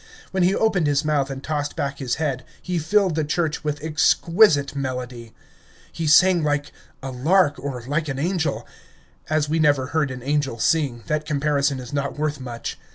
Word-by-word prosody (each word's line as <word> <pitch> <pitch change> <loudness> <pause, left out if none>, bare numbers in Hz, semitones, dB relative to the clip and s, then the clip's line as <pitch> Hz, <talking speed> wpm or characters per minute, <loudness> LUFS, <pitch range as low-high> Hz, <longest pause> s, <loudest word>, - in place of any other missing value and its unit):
When 190 - 0
he 185 +3 +3
opened 200 -8 +2
his 145 +1 +1
mouth 145 -3 +1
and 135 -1 -6
tossed 145 -2 -3
back 140 0 -3
his 125 -3 -1
head, 140 -5 -2 0.2
he 180 -1 -2
filled 190 +3 +2
the 155 0 0
church 160 +1 -1
with 150 -1 -3
exquisite 160 -1 +3
melody. 125 -4 -5 0.6
He 165 - -3
sang 175 +2 +5
like 145 -1 -1 0.3
a 135 - -4
lark, 145 +3 +2
or 130 -3 -5
like 155 +4 -1
an 135 -2 -3
angel. 160 -1 -1 0.6
As 155 -1 +1
we 160 +2 0
never 145 -4 +3
heard 155 -3 +1
an 130 -1 -7
angel 140 -3 -1
sing, 130 -3 0
that 150 0 -2
comparison 140 -2 0
is 125 +1 -9
not 140 0 -2
worth 150 -1 -2
much. 120 -3 -6
145 Hz, 180 wpm, -23 LUFS, 135-160 Hz, 0.6 s, sang